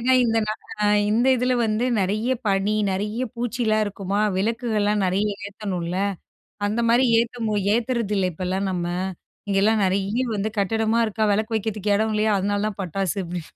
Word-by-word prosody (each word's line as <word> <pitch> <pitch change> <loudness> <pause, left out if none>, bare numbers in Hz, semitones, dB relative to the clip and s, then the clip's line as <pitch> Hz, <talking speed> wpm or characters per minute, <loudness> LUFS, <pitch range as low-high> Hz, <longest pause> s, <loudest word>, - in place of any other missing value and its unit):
ஏன்னா 255 +2 +3
இந்த 225 -1 +2 0.7
இந்த 235 +4 +2
இதில 250 +1 +1
வந்து 215 +3 0 0.2
நிறைய 210 +6 0 0.2
பனி, 195 +2 +1 0.2
நிறைய 210 +5 -2
பூச்சிலாம் 235 -2 0
இருக்குமா 200 0 -2 0.2
விளக்குகள்லாம் 210 -2 0
நிறைய 195 +3 +1 0.2
ஏத்தணும்ல, 185 -4 -4 0.7
அந்த 215 +3 0
மாதிரி 245 +3 +4 0.2
ஏத்த 225 -3 -1 0.2
ஏத்துறதில்லை 220 -6 0
இப்போலாம் 185 +3 -2
நம்ம, 175 -2 -2 0.6
இங்கேலாம் 205 +2 +3
நிறைய 195 +4 0 0.2
வந்து 205 +2 -1
கட்டிடமா 220 +3 +1
இருக்கா, 220 +1 -3
விளக்கு 215 +2 -1
வைக்கிறதுக்கு 210 -1 -1
இடம் 220 +1 0
இல்லையா, 215 0 +2
அதனால 205 +1 0
தான் 200 -1 -7
பட்டாசு, 185 -1 -2
அப்டி 175 -1 -4
210 Hz, 140 wpm, -23 LUFS, 195-225 Hz, 0.7 s, மாதிரி